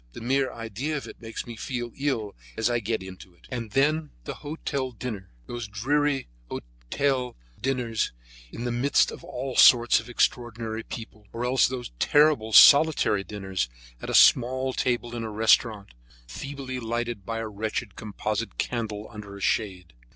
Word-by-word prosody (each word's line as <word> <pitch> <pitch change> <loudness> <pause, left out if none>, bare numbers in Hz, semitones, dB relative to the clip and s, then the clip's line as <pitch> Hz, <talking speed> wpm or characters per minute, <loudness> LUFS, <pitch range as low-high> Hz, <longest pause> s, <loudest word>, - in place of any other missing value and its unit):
The - - -8
mere 130 +2 +1
idea 120 +7 -4
of 140 - -6
it - - -12
makes 115 -1 -6
me 120 - -8
feel 120 0 -4
ill 130 -8 -2 0.2
as 115 +2 +1
I 120 - +1
get 110 -1 -2
into 95 -1 -11
it. - - -21
And 120 -3 -4
then 150 +4 +2
the - - -5
hotel 145 -3 -4
dinners—those 110 - -7
dreary 135 +6 0 0.2
table - - -5 0.3
d'hote 130 - 0 0.3
dinners 125 -4 -1 0.4
in 115 - -6
the 120 - -1
midst 125 +4 +2
of - - -10
all 130 +1 -5
sorts 120 -1 +7
of - - -10
extraordinary 115 -2 -1
people, 110 -2 -9
or 120 +1 -3
else 130 +1 +4
those 125 - -5
terrible 145 -7 +4
solitary 140 -6 +7
dinners 95 -8 -3 0.3
at - - -6
a - - 0
small 130 +1 +5
table 120 -1 -1
in 115 - -3
a 110 - -4
restaurant, 110 -1 +2 0.4
feebly 130 - -6
lighted 120 -2 -3
by 115 +3 -4
a 115 0 -3
wretched 105 0 -4
composite 110 +1 -4
candle 110 -3 -3
under 105 -2 -9
a - - -10
shade. 90 -7 -1
120 Hz, 165 wpm, -26 LUFS, 110-130 Hz, 0.4 s, sorts